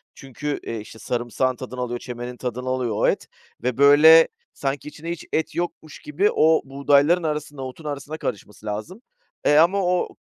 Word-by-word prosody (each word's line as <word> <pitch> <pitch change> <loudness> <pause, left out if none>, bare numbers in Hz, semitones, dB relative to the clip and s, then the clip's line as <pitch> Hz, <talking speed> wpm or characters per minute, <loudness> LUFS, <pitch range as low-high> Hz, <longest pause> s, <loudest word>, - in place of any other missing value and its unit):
çünkü, 145 +2 -5
e, 115 -1 -4
işte, 110 +1 -11
sarımsağın 125 +1 -1
tadını 130 0 -8
alıyor, 120 -1 -3
çemenin 125 0 -7
tadını 125 +1 -4
alıyor 125 -4 -1
o - - +2
et - - 0 0.4
ve, 125 -1 -1
böyle, 150 +4 +8 0.3
sanki 140 +1 -3
içinde 165 +3 -7
hiç 170 - -6
et 160 - -1
yokmuş 170 -3 -5
gibi 180 +8 0
o 160 +1 +4
buğdayların 140 +5 +3
arasında, 150 -2 -3
otun 130 +4 -8
arasına 145 +1 -5
karışması 105 - -6
lazım. 110 - -5 0.4
E, 145 - +4
ama 185 +5 +4
o 180 0 +1
140 Hz, 170 wpm, -23 LUFS, 125-155 Hz, 0.4 s, böyle